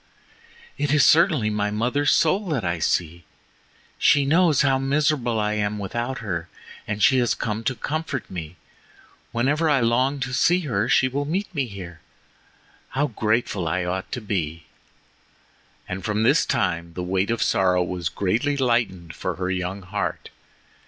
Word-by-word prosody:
"It 145 -2 0
is 150 -2 +5
certainly 155 - +4
my 105 0 0
mother's 125 +7 0
soul 190 +6 +2
that 135 - -1
I 85 0 -1
see. 85 +1 -1 0.8
She 145 -1 +4
knows 160 -1 +4
how 135 -1 +2
miserable 135 -4 +1
I 105 0 0
am 105 0 -1
without 120 +6 -3
her 85 -4 -3 0.4
and 105 0 -2
she 130 -1 +5
has 120 -2 +1
come 110 0 -3
to 130 - 0
comfort 150 -4 -3
me. 85 -2 -7 0.8
Whenever 145 +7 +1
I 145 -2 +4
long 130 +4 +1
to 125 +1 -3
see 175 +7 +3
her 115 - -1
she 130 - +4
will 140 +2 -2
meet 185 +6 -3
me 140 -6 -1
here; 95 -5 -9 0.9
how 145 +2 0
grateful 110 -5 -1
I 90 +3 -1
ought 95 +1 -3
to 125 - -3
be!" 85 -6 -3 1.2
And 95 +1 -5
from 105 0 0
this - - +3
time 85 0 -1
the 90 - -3
weight 95 +3 0
of 115 - +1
sorrow 90 -2 +2
was 90 -2 -3
greatly 115 +9 0
lightened 115 -10 0
for 90 +1 -4
her 90 +1 -2
young 95 +1 -3
heart. 90 - -4
110 Hz, 160 wpm, -23 LUFS, 95-140 Hz, 1.2 s, is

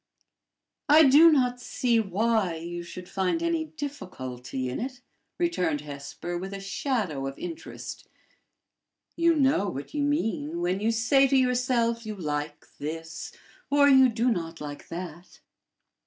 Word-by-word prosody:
"I 310 +2 +8
do 300 +4 +8
not 250 -4 +2
see 240 -2 +1
why 210 -2 +1
you 170 +2 -5
should 180 +1 -9
find 195 - -1
any 335 -1 0
difficulty 135 - -6
in 125 - -3
it," 255 +1 -5 0.4
returned 180 - 0
Hesper, 150 +4 -6
with 190 +2 -6
a - - -6
shadow 195 - -2
of 135 - -6
interest. 335 -2 -7 1.1
"You 335 0 +3
know 265 -9 +2
what 140 - -7
you 295 - -1
mean 225 - -1
when 180 +2 0
you 215 +2 +1
say 245 +5 +4
to 270 - +3
yourself 250 -2 +1
you 215 -1 -5
like 150 -4 -4
this, 160 +2 -6 0.4
or 285 0 +5
you 265 -2 +7
do 235 +2 +1
not 165 -5 -3
like 145 -1 -7
that." 175 0 -8
215 Hz, 140 wpm, -27 LUFS, 165-265 Hz, 1.1 s, I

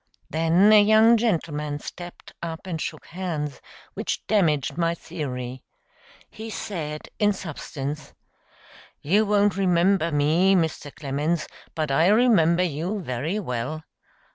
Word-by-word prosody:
Then 165 +7 +4
a 210 - +8
young 220 +2 +6
gentleman 155 -10 -1
stepped 175 +4 -10
up 165 +1 -6
and 165 -4 -4
shook - - -5
hands, 165 -6 -4 0.3
which - - -4
damaged 160 -10 +1
my 170 0 0
theory. 130 -7 -6 0.7
He 220 +1 -8
said, 155 -8 -5
in 210 -1 +3
substance: 150 -4 -6 0.9
"You 205 +8 +3
won't 205 -1 +2
remember 180 -2 +2
me, 160 +7 +3
Mr. 160 -4 -1
Clemens, 150 +4 -2 0.3
but 155 -3 -1
I 160 +5 +4
remember 200 -6 +4
you 175 +5 -2
very 155 - -2
well. 130 - -4
170 Hz, 120 wpm, -24 LUFS, 150-195 Hz, 0.9 s, a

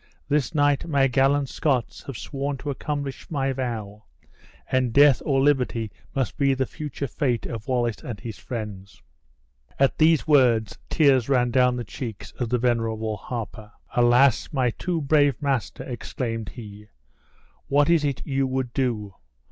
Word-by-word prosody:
This 145 0 0
night 145 0 +2
my 140 -4 +3
gallant 135 +2 +2
Scots 130 -4 -1
have 135 -5 -5
sworn 140 0 -4
to 145 +2 -4
accomplish 140 -1 -4
my 135 -3 0
vow, 110 -5 -5 0.6
and 130 -2 0
death 140 +1 +6
or 135 -2 +1
liberty 125 -6 +1 0.2
must 130 -5 -1
be 140 -1 +3
the 130 0 0
future 145 +1 -5
fate 125 -2 -1
of 115 0 -6
Wallace 120 -4 0
and 115 -5 -6
his 115 -2 -7
friends." 105 -5 -7 0.7
At 135 0 +2
these 160 0 +4
words, 125 -8 +3
tears 135 -6 +3
ran 125 -3 +2
down 125 0 +3
the 120 - -3
cheeks 115 -1 -7
of 120 -3 -1
the 125 - +2
venerable 115 -2 0
harper. 110 -1 -7 0.2
"Alas! 120 +1 +4
my 130 -5 +1
too 170 +6 -2
brave 145 -2 +3
master," 140 -5 -2
exclaimed 115 -2 -4
he, 105 -3 -11 0.8
"what 145 +1 +3
is 170 -3 +3
it 140 -3 -2
you 135 -1 0
would 130 -2 -2
do? 115 -7 -1
130 Hz, 155 wpm, -24 LUFS, 115-140 Hz, 0.8 s, death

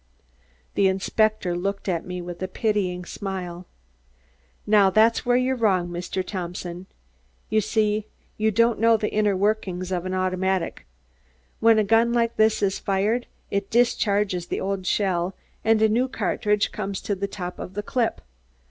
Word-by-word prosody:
The 195 - +3
inspector 195 0 +1
looked 200 +3 -3
at 175 -2 -1
me 180 -1 -5
with 175 0 -8
a 185 - -1
pitying 185 -3 -1
smile. 185 -3 -6 1.0
"Now, 205 -2 +5
that's 220 +5 +3
where 245 0 +4
you're 255 +1 +1
wrong, 190 -7 +1
Mr. 175 +2 -3
Thompson. 180 -1 -5 0.6
You 215 0 +3
see, 215 0 0 0.3
you 220 0 +1
don't 230 +2 +2
know 230 0 +5
the 210 0 -2
inner 210 -2 +2
workings 190 -3 -1
of 180 0 -2
an 185 - -2
automatic. 185 - -1 0.7
When 225 0 +5
a 215 - +4
gun 225 +3 +3
like 235 -1 +1
this 220 -1 +3
is 195 -1 +1
fired, 205 +5 0 0.2
it 200 0 -1
discharges 205 -6 +1
the - - -2
old 190 -1 -3
shell 185 -2 0 0.3
and 220 -1 +3
a - - +6
new 235 +4 +1
cartridge 210 -4 0
comes 200 -2 -4
to 205 - -2
the 200 +1 -2
top 180 -2 -6
of 185 - -7
the 205 - -3
clip. 240 +1 -1
200 Hz, 160 wpm, -24 LUFS, 185-220 Hz, 1.0 s, a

